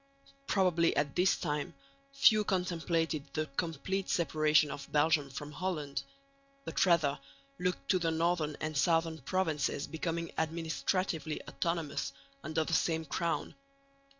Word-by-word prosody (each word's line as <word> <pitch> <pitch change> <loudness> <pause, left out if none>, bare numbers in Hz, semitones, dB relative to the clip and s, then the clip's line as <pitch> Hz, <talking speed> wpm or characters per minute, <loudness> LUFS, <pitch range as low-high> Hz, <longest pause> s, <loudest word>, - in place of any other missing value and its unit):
Probably 175 -4 +3
at 145 -1 0
this 185 +2 +3
time 150 -4 -2 0.4
few 225 -6 +5
contemplated 165 -5 -1
the 155 0 0
complete 185 +4 -2
separation 155 -2 +3
of 140 -1 -8
Belgium 150 -1 +3
from 145 +2 -7
Holland, 150 -5 -3 0.6
but - - +1
rather 155 -5 +3 0.4
looked 180 0 -1
to 185 - +4
the 165 -1 +1
northern 160 -2 0
and 155 0 -3
southern 165 +2 +2
provinces 155 -3 0
becoming 165 +1 -3
administratively 160 0 -1
autonomous 165 -4 -2 0.3
under 155 +2 0
the 165 - -4
same 160 -1 +1
crown. 170 +3 -2
165 Hz, 125 wpm, -32 LUFS, 150-175 Hz, 0.6 s, few